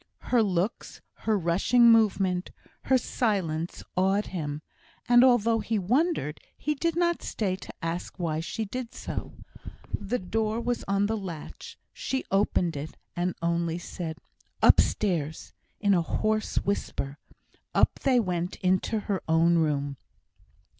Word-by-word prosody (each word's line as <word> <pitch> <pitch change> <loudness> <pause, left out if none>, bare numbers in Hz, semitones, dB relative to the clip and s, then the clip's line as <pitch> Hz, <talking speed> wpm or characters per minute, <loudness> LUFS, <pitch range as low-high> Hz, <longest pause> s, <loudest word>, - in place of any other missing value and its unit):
Her 245 -2 +5
looks, 195 +1 -1 0.3
her 215 -1 +4
rushing 200 +7 +4
movement, 195 -5 +3 0.4
her 260 - +4
silence, 185 -10 -1
awed 195 +3 +2
him; 150 -4 -4 0.4
and 240 0 +7
although 230 -3 +4
he 220 0 -1
wondered, 240 - 0 0.2
he 300 - -1
did 335 +3 -1
not 345 0 +1
stay 195 -4 -1
to - - -10
ask 170 +2 -4
why 160 -3 -1
she 215 +7 -3
did 235 +3 -6
so. - - -5 0.6
The 210 +4 -1
door 220 +3 -1
was 240 0 -2
on 200 0 +2
the 220 +2 0
latch; 180 -7 -7 0.2
she 265 0 -3
opened 190 -4 +2
it, 145 +2 -6 0.2
and 175 +1 -1
only 170 0 0
said, 170 -2 -6 0.5
"Upstairs," 160 -7 +3 0.3
in 200 -1 +3
a 175 - +4
hoarse 215 +5 -1
whisper. 145 -8 -2 0.6
Up - - +3
they 260 -2 +3
went 180 -4 -1
into 190 +4 +1
her 200 -3 -2
own 165 +1 +4
room. 145 -3 0
195 Hz, 135 wpm, -27 LUFS, 170-225 Hz, 0.6 s, and